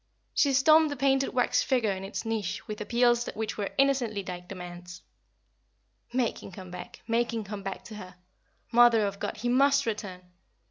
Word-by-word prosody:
She 280 -2 +3
stormed 310 +4 +5
the 285 - -3
painted 270 0 +2
wax 250 -1 +2
figure 245 -6 +1
in 190 0 -4
its 195 +4 -5
niche 220 -2 -3
with 210 -1 -6
appeals 240 +2 +2
which 220 0 -3
were 205 -2 -3
innocently 255 -7 +1
like 180 0 -7
demands. 180 -1 -9 1.1
Make 245 -2 -1
him - - -10
come 185 -1 -10
back 180 0 -9
make 235 +1 +1
him 225 -2 -3
come 205 0 -7
back 195 0 -6
to 220 - -11
her. 185 -2 -10 0.6
Mother 235 -2 +6
of 200 0 -4
God, - - -4
he 230 +3 -3
must 280 +2 +4
return! 205 -5 -4
225 Hz, 180 wpm, -28 LUFS, 195-250 Hz, 1.1 s, Mother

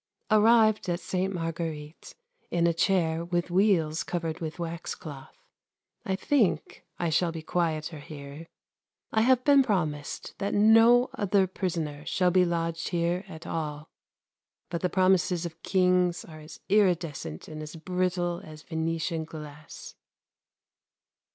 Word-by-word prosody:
Arrived 215 -2 +5
at 175 0 0
Sainte 190 +1 -2
Marguerite 165 -2 -5 0.3
in 170 -1 +1
a 170 - +3
chair 165 -2 +1
with 175 0 -2
wheels 175 -5 +2
covered 165 -2 -3
with 160 -2 -5
wax 170 -1 -4
cloth. 145 -6 -10 0.7
I 190 - +1
think 190 - 0
I 170 -2 -1
shall 170 +2 +2
be 165 -1 -7
quieter 160 -2 -1
here. 145 +2 -10 0.6
I 220 - +2
have 255 +1 +4
been 280 0 +6
promised 155 - -2
that 200 0 -1
no 225 +4 +6
other 200 -1 +2
prisoner 165 -6 -3
shall 180 -1 +2
be 180 0 +4
lodged 165 -1 -2
here 175 +1 -1
at 160 -4 -10
all, 150 -2 -4 0.8
but 170 - -2
the 180 - +1
promises 185 -2 +2
of 165 -1 -8
Kings 180 -2 +2
are 155 -1 -11
as 155 -2 -12
iridescent 175 - 0
and 155 -1 -7
as 155 +2 -8
brittle 175 +1 -1
as 155 -1 -11
Venetian 165 0 -2
glass. 150 -1 -10
170 Hz, 135 wpm, -28 LUFS, 160-185 Hz, 0.8 s, been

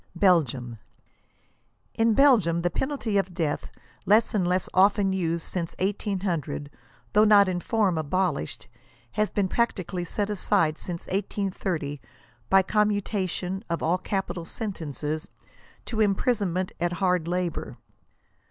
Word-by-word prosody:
BELGIUM. 135 - +2 1.1
In 225 -1 +2
Belgium 210 - +4
the 175 - +1
penalty 255 - -1
of 190 -2 -3
death, 155 -3 -2 0.4
less 215 +3 +4
and 190 -5 +1
less 180 +1 +1
often 195 0 +4
used 170 -3 -1
since 170 -3 -3
1800, 185 -7 -2 0.4
though 210 - +6
not 205 -2 +6
in 180 -1 -1
form 195 -4 +1
abolished, 160 - -1 0.4
has 215 0 0
been 200 -2 0
practically 185 -5 -1
set 205 +4 -2
aside 160 -5 +1
since 170 -2 -5
1830, 185 -7 -2 0.5
by 195 0 +6
commutation 200 -2 -1
of 170 - -2
all 175 +3 +2
capital 190 -3 -3
sentences, 155 - -4 0.6
to 220 -2 -2
imprisonment 200 -3 +1
at 175 +1 0
hard 180 -2 +1
labor. 175 -1 -2
185 Hz, 120 wpm, -26 LUFS, 170-205 Hz, 1.1 s, though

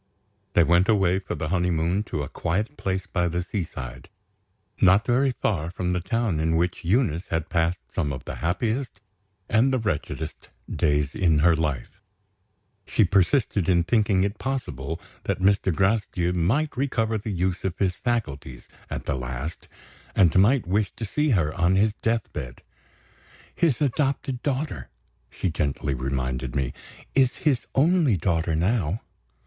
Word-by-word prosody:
They 85 - +5
went 85 +4 +3
away 95 -4 +3
for 95 - -5
their 75 - -3
honeymoon 90 +1 +1
to 75 - -3
a - - -4
quiet 105 - -2
place 95 -5 -2
by 90 -2 0
the 90 +1 -1
seaside, 70 - -6 0.7
not 95 +4 +5
very 130 +2 +3
far 85 -6 0
from 90 0 -2
the 90 - 0
town 100 -1 -1
in 80 +1 +1
which 85 +2 0
Eunice 90 - +1
had 80 -1 -2
passed 85 0 0
some 75 -6 -1
of 65 - -6
the - - -6
happiest 110 +7 -1 0.5
and 115 +5 +3
the 130 - +2
wretchedest 80 -7 -4 0.2
days 75 -2 +1
in 85 -5 +3
her 85 -1 +6
life. 75 -6 -3 0.9
She 110 - +3
persisted 100 - +2
in 85 -2 +4
thinking 100 -1 +2
it 100 +2 -2
possible 125 - -3 0.3
that - - 0
Mr. 95 0 +3
Gracedieu 95 -1 +1
might 115 - +1
recover 115 -4 0
the 105 - -6
use 90 -1 -1
of 95 -2 -2
his 95 -2 +1
faculties, 75 - -3 0.2
at - - -5
the - - 0
last, 65 +4 -5 0.5
and 85 -5 +4
might 115 +6 +4
wish 100 +3 0
to 115 - -4
see 150 +9 0
her 85 - +2
on 90 +3 +2
his 105 +2 +3
death 115 0 -2
bed. 60 -5 -7 0.9
"His 160 -8 +1
adopted 135 -2 0
daughter," 145 +1 -2 0.4
she 95 - -2
gently 70 -2 -1
reminded 65 -1 -2
me, 65 -3 -1 0.4
"is 130 -2 +3
his 130 -6 +2
only 155 - +4
daughter 80 -1 0
now." 95 +2 0
95 Hz, 155 wpm, -25 LUFS, 80-115 Hz, 0.9 s, her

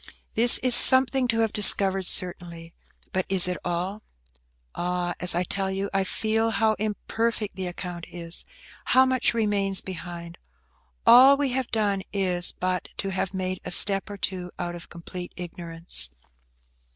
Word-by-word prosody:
This 235 +2 +6
is 255 -1 +5
something 260 0 +7
to 230 -1 0
have 225 -2 -1
discovered, 195 -2 +2
certainly, 170 -2 -3 0.4
but 185 - 0
is 190 -2 +5
it 180 -1 -2
all? 180 +4 -4 0.7
Ah! 180 0 -3
as 180 -1 +3
I 175 - 0
tell 195 +2 -3
it, 195 +1 -3
I 195 0 +1
feel 220 +3 -1
how 220 0 +1
imperfect 215 +1 -3
the 185 -1 -5
account 175 -1 -8
is–how 175 +9 -2
much 255 -2 0
remains 200 -3 0
behind. 175 -2 -9 0.7
All 255 +4 +7
we 285 -1 -1
have 260 -1 -3
done 205 -3 -1
is 180 -3 0
but 185 0 -4
to 195 - -4
have 190 0 -4
made 185 0 -4
a - - -6
step 195 +2 +2
or 205 - -8
two 185 -2 -4
out 175 -1 -5
of 175 -1 -11
complete 175 +1 -9
ignorance. 170 - -3
190 Hz, 150 wpm, -24 LUFS, 175-220 Hz, 0.7 s, something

